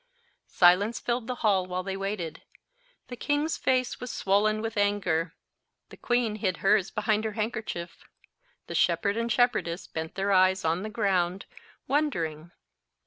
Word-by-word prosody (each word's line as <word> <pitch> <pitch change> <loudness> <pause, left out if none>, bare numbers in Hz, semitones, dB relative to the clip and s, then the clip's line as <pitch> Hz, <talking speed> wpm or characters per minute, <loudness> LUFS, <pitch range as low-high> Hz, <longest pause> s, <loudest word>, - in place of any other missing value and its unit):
Silence 190 +6 +4
filled 240 -1 -2
the 250 - -2
hall 190 -3 +3
while 185 0 -3
they 190 0 -4
waited. 195 -5 -4 0.7
The 250 - -6
king's 290 +5 0
face 255 -1 0
was 250 - -6
swollen 210 +2 +1
with 225 +1 -4
anger. 185 -5 0 0.5
The - - -13
queen 240 -3 0
hid 185 -4 -1
hers 195 -1 +4
behind 215 0 0
her 220 -1 -3
handkerchief. 215 -5 -4 0.6
The - - -7
shepherd 200 -1 +2
and 230 +1 -1
shepherdess 200 -8 +1
bent 160 -1 -6
their 195 +1 0
eyes 185 -1 +4
on 165 +3 +1
the 215 - -4
ground, 190 -4 0 0.4
wondering. 170 - -1
205 Hz, 145 wpm, -27 LUFS, 180-225 Hz, 0.7 s, Silence